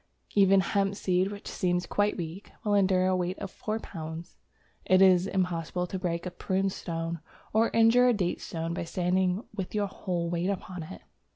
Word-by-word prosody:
Even 195 -1 +5
hemp 195 +2 0
seed, 185 0 +1
which 205 -1 -8
seems 180 -1 0
quite 205 +3 0
weak, 175 +3 -6
will 210 -2 +1
endure 190 -2 +3
a 185 0 +2
weight 180 +1 -1
of 195 - -6
four 215 +1 -3
pounds. 165 -4 -7 0.5
It 185 0 +4
is 185 -1 +6
impossible 180 -2 -1
to 185 +1 -5
break 170 -1 -2
a 180 - -3
prune 190 +2 -1
stone, 165 -2 -4 0.3
or 225 +2 +4
to - - -2
injure 230 +2 +6
a 245 - +5
date 185 -5 -1
stone, 165 0 -4
by 170 - -3
standing 180 +3 0
with 195 -1 -5
your 205 -1 +2
whole 180 -3 -3
weight 170 +2 -1
upon 185 -2 -4
it. 95 -13 -9
185 Hz, 190 wpm, -28 LUFS, 175-195 Hz, 0.5 s, is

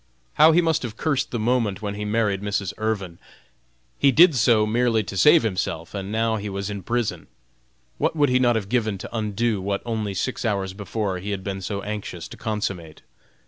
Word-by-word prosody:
How 155 +2 +7
he 170 +2 +4
must 160 -1 +1
have 115 -3 -6
cursed 140 -4 0
the 120 - -3
moment 110 -3 0
when 100 -1 -2
he 105 +1 -5
married 105 -2 0
Mrs. 100 -2 -2
Irvin. 100 -6 -2 0.8
He 140 - +5
did 170 +3 +7
so 115 -3 +4
merely 115 0 +1
to 95 +1 -7
save 150 - +6
himself, 90 -5 -3
and 100 0 -5
now 110 0 +1
he 105 0 -5
was 100 +1 -4
in 100 -1 -5
prison! 120 +4 -2 0.7
What - - +1
would 145 -3 +3
he 125 0 +3
not 120 -2 +3
have 105 -3 -2
given 110 -3 0
to 95 - -8
undo 110 -1 -1
what 100 +1 -2
only 110 -4 -2
six 130 +7 -2
hours 100 -4 -1
before 100 -1 -3
he 100 +3 -6
had 100 -2 -3
been 95 -1 -4
so 100 +2 -4
anxious 105 -5 -5
to - - -9
consummate! 100 -8 -4
105 Hz, 200 wpm, -23 LUFS, 100-120 Hz, 0.8 s, How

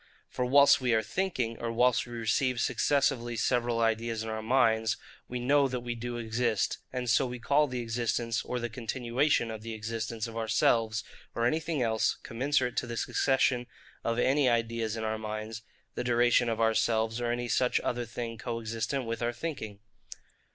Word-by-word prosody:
For 125 - -2
whilst 140 +1 +6
we 125 -3 +2
are 110 - +2
thinking, 130 -12 -2
or 115 0 -2
whilst 125 +1 +2
we 120 - -9
receive 120 +2 0
successively 125 -3 +1
several 120 -1 +1
ideas 115 0 0
in 110 - -5
our 110 0 -3
minds, 110 -2 +2 0.3
we 125 - -4
know 140 +3 +3
that 125 -2 -3
we 120 0 -3
do 120 +1 -5
exist; 115 -2 0
and 125 -1 -3
so 120 +3 +3
we 125 0 -5
call 145 +5 +2
the 125 -2 -3
existence, 115 0 -1
or 125 - -3
the 120 - -2
continuation 120 +2 0
of 110 -1 -6
the 115 0 -6
existence 115 +1 -4
of 115 -1 -8
ourselves, 110 -1 +1 0.3
or 115 - +1
anything 155 +1 0
else, 110 -1 +1
commensurate 130 +1 0
to 120 - 0
the 115 0 -5
succession 130 -2 +1 0.4
of 115 0 -1
any 130 +2 +3
ideas 115 -1 0
in 110 - -3
our 110 0 -2
minds, 110 +1 -5 0.3
the - - -3
duration 120 0 +3
of 115 - -2
ourselves, 115 0 +1
or 120 -1 0
any 120 0 -2
such 125 +1 +2
other 120 -1 -2
thing 115 -1 -5
co 115 +1 -3
existent 115 +4 -2
with 115 +1 -4
our 120 0 +1
thinking. 120 -7 -6
120 Hz, 180 wpm, -29 LUFS, 115-125 Hz, 0.4 s, whilst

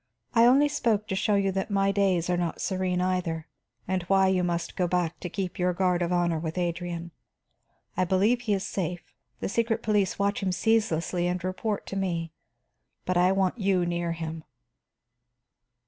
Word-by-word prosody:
I 230 0 +6
only 275 +4 +5
spoke 230 -8 0
to 190 - -1
show 210 +1 +1
you 195 -1 +2
that 190 +2 -2
my 195 -1 +2
days 195 -4 +1
are 180 - +1
not 175 -2 -2
serene 185 -1 -1
either, 180 -3 -1 0.4
and 185 0 0
why 190 0 +4
you 185 -1 +2
must 170 -1 -2
go 180 - +1
back 175 -1 -1
to 180 - -5
keep 185 0 -4
your 180 0 +2
guard 180 -1 +1
of 175 0 0
honor 175 -2 +1
with 160 +1 -4
Adrian. 170 -1 -3 0.8
I 185 - +2
believe 205 +7 +2
he 220 -4 0
is 195 0 -3
safe; 180 -3 -4 0.3
the - - -1
secret 230 +2 0
police 205 -3 +1
watch 200 +1 0
him 190 -2 0
ceaselessly 180 -4 +1
and 180 0 -2
report 200 +3 -2
to - - -6
me. 170 -4 -2 0.7
But 185 - 0
I 180 +1 +4
want 195 +3 +1
you 190 -3 +2
near 170 -1 -1
him." 160 -1 -5
185 Hz, 180 wpm, -27 LUFS, 175-200 Hz, 0.8 s, I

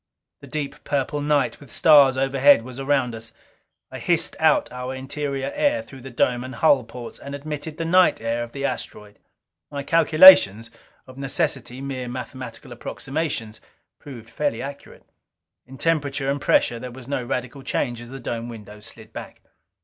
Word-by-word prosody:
The 140 - -13
deep 145 0 -5
purple 145 +1 -1
night 145 -2 +1
with 140 -5 -15
stars 140 -4 +6
overhead 135 -1 +4
was 130 +1 -9
around 135 -3 0
us. 115 0 -8 0.6
I - - -7
hissed - - +1
out - - +3
our 125 +1 -5
interior 135 +1 -4
air 290 -1 +1
through 135 - -13
the 135 - -9
dome 120 0 0
and 130 -1 -8
hull 140 -2 +4
ports, 120 0 -9
and 140 0 -7
admitted 150 +2 -6
the 165 - -3
night 180 +2 +4
air 115 +1 -2
of 120 0 -6
the 140 +1 -4
asteroid. 105 -6 -6 0.5
My 140 -1 -5
calculations 155 - +7 0.3
of 130 +1 -13
necessity 130 -1 -2
mere 130 -2 -5
mathematical 125 -1 -8
approximations 130 -2 -4 0.4
proved 115 -5 -11
fairly 145 -1 -1
accurate. 140 +1 -9 0.6
In 135 +1 -12
temperature 145 -4 0
and 140 0 -3
pressure 120 - +2
there 125 +1 -7
was 125 0 -11
no 135 -2 -2
radical 125 +2 -4
change 120 -2 -2
as 120 - -11
the 135 +1 -8
dome 120 -1 -5
windows 105 -2 -10
slid - - -13
back. - - -9
135 Hz, 165 wpm, -23 LUFS, 120-145 Hz, 0.6 s, calculations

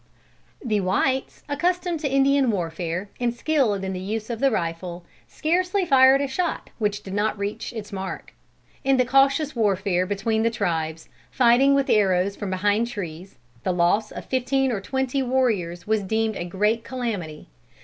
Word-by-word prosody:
The 215 -3 +1
whites, 260 +8 0
accustomed 350 +3 0
to 285 -3 -2
Indian 275 -1 +3
warfare 175 0 -3
and 240 -1 +1
skilled 240 -6 0
in 190 0 -3
the 185 - -4
use 215 +4 -4
of 230 - -4
the 275 - +4
rifle, 175 -3 -3 0.2
scarcely 360 +4 0
fired 265 -2 +6
a 280 - 0
shot 340 +5 -3
which 210 -1 -1
did 190 - -7
not 210 +1 0
reach 205 +3 -4
its 215 -3 -8
mark. 190 0 -6 0.5
In 270 0 +3
the 255 - +3
cautious 275 +3 +3
warfare 195 -4 +1
between 215 +3 0
the 230 - +3
tribes, 165 -7 -2 0.2
fighting 255 +3 +4
with 275 -1 +1
arrows 195 -1 +2
from 205 - -5
behind 205 +4 +1
trees, 180 - -7 0.3
the 185 - 0
loss 180 +5 +2
of - - -8
fifteen 265 +1 +1
or 210 -4 -2
twenty 265 +5 -1
warriors 225 -10 0
was 220 0 +1
deemed 220 +2 -1
a 175 - -4
great 210 +6 0
calamity. 205 - -5
220 Hz, 165 wpm, -24 LUFS, 190-265 Hz, 0.5 s, fired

